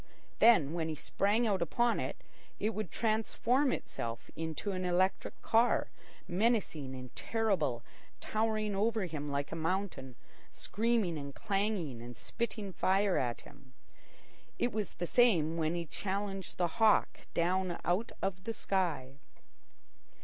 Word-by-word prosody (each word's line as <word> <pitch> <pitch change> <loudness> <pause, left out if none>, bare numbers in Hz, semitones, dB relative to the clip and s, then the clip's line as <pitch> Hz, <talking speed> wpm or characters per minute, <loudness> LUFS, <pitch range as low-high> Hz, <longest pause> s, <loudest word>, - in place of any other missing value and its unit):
Then, 180 -11 +6
when 165 -2 -1
he 155 - -2
sprang 205 +9 +1
out 200 -4 +1
upon 235 +8 +2
it, - - -3 0.4
it 215 - +1
would 215 -4 -4
transform 230 - +1
itself 115 0 -4
into 160 +5 -3
an 185 -1 -2
electric 180 +1 +1
car, 230 +2 +3 0.4
menacing 180 - 0
and 125 -1 -9
terrible, 190 - 0 0.4
towering 215 -1 0
over 220 0 +1
him 150 -4 -4
like 140 0 -2
a - - -3
mountain, 165 -6 -2 0.3
screaming 215 -7 0
and 140 -1 -7
clanging 195 - -1
and 120 0 -9
spitting 220 -4 -4
fire 195 +1 +2
at 120 -2 -2
him. 130 -1 -17 0.8
It 240 - +1
was 215 -3 -2
the 175 - -2
same 170 -8 +4
when 160 0 0
he 170 -1 -2
challenged 195 +3 -4
the 175 - +2
hawk 220 -1 +3
down 180 +1 +1
out 185 +6 +1
of 190 0 -2
the 230 - -2
sky. 160 -11 -1
190 Hz, 135 wpm, -33 LUFS, 160-215 Hz, 0.8 s, Then